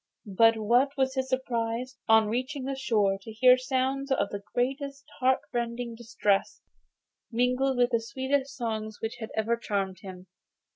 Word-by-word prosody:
But 225 +2 +6
what 245 +6 +2
was 265 -1 +1
his 265 -1 -2
surprise, 250 -1 -2
on 220 -1 +5
reaching 260 +5 -2
the 270 +1 -3
shore, 210 -7 +1
to 220 - -9
hear 250 +3 +6
sounds 265 +2 -1
of 200 -6 +1
the 205 - -4
most 275 +2 -2
heartrending 245 -3 -1
distress, 225 -4 -1 0.7
mingled 250 +3 +1
with 245 0 +3
the 230 -1 +2
sweetest 265 +4 -2
songs 220 -3 -3
which 225 0 -4
had 220 - -6
ever 220 +2 +1
charmed 195 -5 -2
him! 185 -2 -10
245 Hz, 150 wpm, -28 LUFS, 220-265 Hz, 0.7 s, But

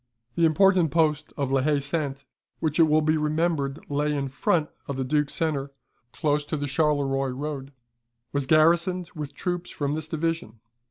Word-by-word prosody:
The 170 - +3
important 180 +1 +4
post 155 0 +1
of 140 -2 -1
La 135 -1 +3
Haye 150 +2 +2
Sainte, 140 -1 -3 0.3
which 155 0 -1
it 165 - +7
will 155 +1 +4
be 155 +1 +2
remembered 150 -2 -1
lay 145 +1 0
in 135 -1 -2
front 150 +4 0 0.2
of 140 - -4
the 135 - -1
Duke's 150 +2 0
centre, 140 -4 -1 0.4
close 150 0 0
to 155 - -3
the 145 - -2
Charleroi 135 -2 +1
road, 140 +1 -5 0.6
was 140 -2 -1
garrisoned 170 +3 +3
with 150 -3 -6
troops 175 +1 -3
from 145 -1 -2
this 155 0 -3
division. 160 -8 -3
150 Hz, 170 wpm, -26 LUFS, 140-160 Hz, 0.6 s, it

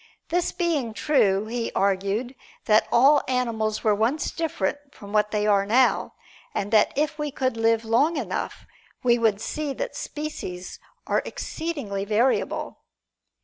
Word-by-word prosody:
This 350 +1 0
being 295 -11 -1
true 210 -9 +2
he 230 +1 -3
argued 200 +5 0 0.3
that 215 -1 +4
all 275 +4 +6
animals 230 -4 -1
were 215 - +4
once 225 +9 0
different 290 - -2 0.2
from 200 0 -11
what 210 0 +3
they 210 -1 0
are 200 -2 +4
now, 245 +6 +2 0.4
and 200 +1 -2
that 215 - +5
if 300 +1 -1
we 300 0 -1
could 260 -3 -1
live 225 0 +2
long 275 +9 +2
enough, - - -4 0.4
we 240 -1 +4
would 220 -3 +2
see 295 +5 -3
that - - -4
species 240 -12 -6 0.3
are - - +1
exceedingly 280 -13 -4
variable. 220 +6 0
230 Hz, 145 wpm, -25 LUFS, 210-285 Hz, 0.4 s, all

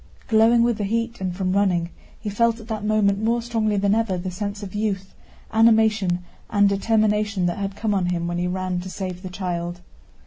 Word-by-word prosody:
Glowing 230 +1 +5
with 235 -2 +1
the - - 0
heat 230 +2 -2
and 185 -2 -2
from 185 -2 0
running, 180 -4 +1 0.3
he - - -8
felt 230 +3 +1
at 225 - -12
that 215 -2 -3
moment 210 -1 +2
more 230 +2 +2
strongly 225 -3 0
than 200 0 +2
ever 220 -4 +1
the 180 +1 -4
sense 205 +2 -4
of 190 - -7
youth, 200 -3 -2 0.4
animation, 220 -5 +3 0.3
and 205 -1 +4
determination 210 -1 +1
that 175 +2 -1
had 195 0 -3
come 215 0 -1
on 190 -3 +1
him 175 -1 -1
when 175 0 -2
he 180 - 0
ran 185 0 -2
to 185 +1 -6
save 185 -2 -5
the 185 - -6
child. 175 -2 -4
200 Hz, 205 wpm, -23 LUFS, 185-220 Hz, 0.4 s, Glowing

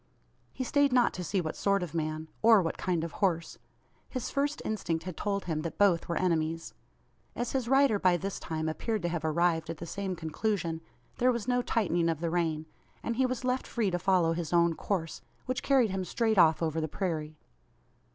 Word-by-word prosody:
He 260 - -4
stayed 285 +2 +3
not 250 -1 +4
to 180 - -5
see 185 +3 0
what 155 -2 -4
sort 200 -2 +1
of 170 -3 -6
man, 155 -1 -2
or 220 -3 +6
what 165 - -2
kind 175 -3 -1
of 165 - -4
horse. 170 -5 -1 0.5
His 255 -3 -4
first 285 +2 0
instinct 170 -6 -2
had 185 -2 -6
told 200 +2 -2
him 160 -3 -1
that 165 0 -5
both 190 -5 +3
were 170 - 0
enemies. 165 -2 0 0.6
As 240 - -2
his 260 -3 -1
rider 270 -5 +4
by 180 -2 +4
this 195 +2 -4
time 160 -1 -3
appeared 210 +6 -2
to 175 - 0
have 170 -2 -3
arrived 160 0 +1
at 165 - -4
the 170 - -7
same 190 +2 -3
conclusion, 165 0 -2 0.4
there 255 +1 +4
was 235 -2 -3
no 245 0 +2
tightening 175 -8 +1
of 160 -2 -1
the 165 0 -2
rein; 160 -3 0 0.4
and 230 0 -2
he 260 0 +3
was 255 -1 -3
left 255 +1 0
free 220 -5 0
to 175 - -1
follow 175 -3 +3
his 165 -2 -4
own 170 -1 +4
course 165 -2 -3 0.2
which 255 0 -2
carried 260 -7 +3
him 190 0 -2
straight 220 +2 +1
off 160 -1 +5
over 160 0 0
the 155 - -1
prairie. 155 -3 -3
180 Hz, 210 wpm, -30 LUFS, 165-220 Hz, 0.6 s, or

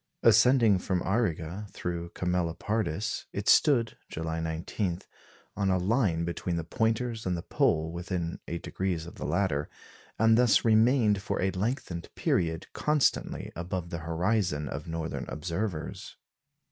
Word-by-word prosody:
Ascending 115 -2 +6
from 90 -1 -1
Auriga 95 -2 -1
through 85 -1 -4
Camelopardus, 90 +2 -1
it 100 +1 -4
stood, 125 -7 +4
July 80 0 -3
19, 85 +3 -2 0.5
on 100 -2 0
a 95 - +3
line 90 -4 +1
between 85 +1 -2
the 85 - -2
Pointers 110 +4 -1
and 90 -1 0
the 85 - -5
Pole, 80 +1 +1
within 85 -1 -3
8° 85 0 -3
of 85 - -9
the - - -4
latter, 75 -8 0 0.5
and 110 +1 +5
thus 125 -2 +4
remained 110 -2 +4
for 120 - -2
a 95 +1 +1
lengthened 95 -4 -3
period 80 -2 0
constantly 150 -1 +1
above 85 0 -4
the 85 - -3
horizon 85 -1 0
of 75 +5 -5
northern 80 0 -3
observers. 85 +1 -4
90 Hz, 135 wpm, -29 LUFS, 85-110 Hz, 0.5 s, Ascending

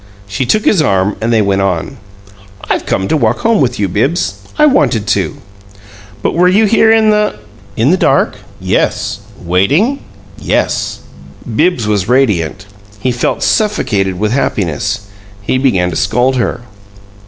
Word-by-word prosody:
She 120 +6 -3
took 215 - +1
his 190 - +3
arm, 100 -6 +1
and 115 +1 0
they 110 -2 +3
went 100 -1 +1
on. 95 +8 -2 0.7
"I've - - -2
come 95 - -1
to - - +1
walk 120 -5 0
home 230 -2 +2
with 130 - 0
you, 100 - +1
Bibbs. 105 - 0 0.2
I 300 - +5
wanted 195 - +2
to." - - 0 0.9
"But - - 0
were 180 +2 +3
you 200 +4 +4
here 220 +1 +4
in 220 -1 +4
the 210 - +1 0.2
" 100 -1 -24
"In 120 +7 +3
the 185 - +3
dark? - - +1 0.2
Yes! 100 - -1 0.2
Waiting? 135 - +1 0.4
Yes!" - - -1 0.5
Bibbs 160 -4 +1
was 105 -1 0
radiant; 105 - +1 0.3
he 130 +4 0
felt 120 0 -1
suffocated 105 - 0
with 105 +3 -1
happiness. 105 - -1 0.4
He 105 +5 -1
began 95 -10 +1
to - - -5
scold 125 +8 +1
her. 120 - -1
120 Hz, 155 wpm, -13 LUFS, -, 0.9 s, I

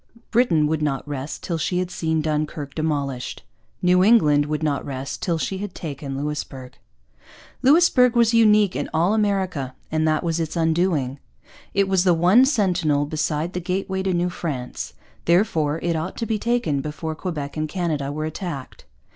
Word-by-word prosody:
Britain 195 -11 +3
would 155 +1 0
not 145 -2 -1
rest 145 0 -5
till 170 -2 -2
she 180 +3 -1
had 180 0 -1
seen 160 -2 -1
Dunkirk 150 -2 -2
demolished. 140 -5 -3 0.4
New 180 +1 +5
England 150 -10 +5
would 150 +1 -2
not 145 -2 0
rest 135 0 -5
till 170 -3 0
she 190 +4 -3
had 205 -2 -6
taken 140 -3 -5
Louisbourg. 140 -3 -5 0.9
Louisbourg 265 -4 +5
was 235 -1 +4
unique 215 -4 +5
in - - -2
all 170 +6 +3
America, 190 -11 0 0.2
and 155 0 +1
that 155 +1 +1
was 170 -1 -1
its 160 0 -3
undoing. 160 -5 +1 0.6
It 200 -1 +3
was 190 -2 +2
the 180 -3 +4
one 185 +10 +5
sentinel 180 - +1
beside 155 +2 -2
the 180 - -3
gateway 190 +2 -2
to 190 0 0
New 175 0 0
France; 140 -8 -5 0.3
therefore 165 -4 +2
it 170 -1 0
ought 160 +4 -4
to 230 - -2
be 220 -2 -1
taken 230 - 0
before 155 +2 -4
Quebec 155 -4 -5
and 155 0 -2
Canada 155 -6 -2
were 155 +1 -3
attacked. 155 -4 -6
160 Hz, 170 wpm, -23 LUFS, 150-190 Hz, 0.9 s, New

